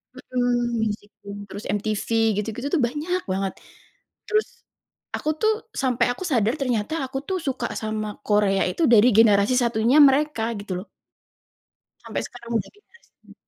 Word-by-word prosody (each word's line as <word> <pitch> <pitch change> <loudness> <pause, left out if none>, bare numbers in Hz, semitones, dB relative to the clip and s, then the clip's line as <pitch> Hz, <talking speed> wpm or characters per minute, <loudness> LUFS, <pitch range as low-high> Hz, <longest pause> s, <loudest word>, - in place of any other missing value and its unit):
Mhm, 240 -1 -1
Music 210 -1 -3
Bank, 200 0 -8
terus 205 - -7
MTV 210 +1 -2 0.3
gitu-gitu 225 +5 -4
tuh 330 - +2
banyak 320 +8 -2
banget. 190 0 -1 0.7
Terus 430 0 +1 0.7
aku 305 - -2
tuh, 435 0 +4 0.2
sampai 255 -3 +1
aku 310 - -8
sadar 230 - +2
ternyata 245 -1 -1
aku 265 +1 -5
tuh 380 - -1
suka 270 -4 -2
sama 215 -1 -4
Korea 205 -2 +3
itu 255 - -2
dari 235 0 +6
generasi 215 +1 +5
satunya 235 +2 +2
mereka 285 -3 +3 0.2
gitu 200 -2 -5
loh. - - -26 1.2
Sampai - - -3
sekarang 235 -1 -11
udah 200 - -5
generasi 470 +3 -25 0.2
5. - - -16
235 Hz, 145 wpm, -23 LUFS, 210-270 Hz, 1.2 s, dari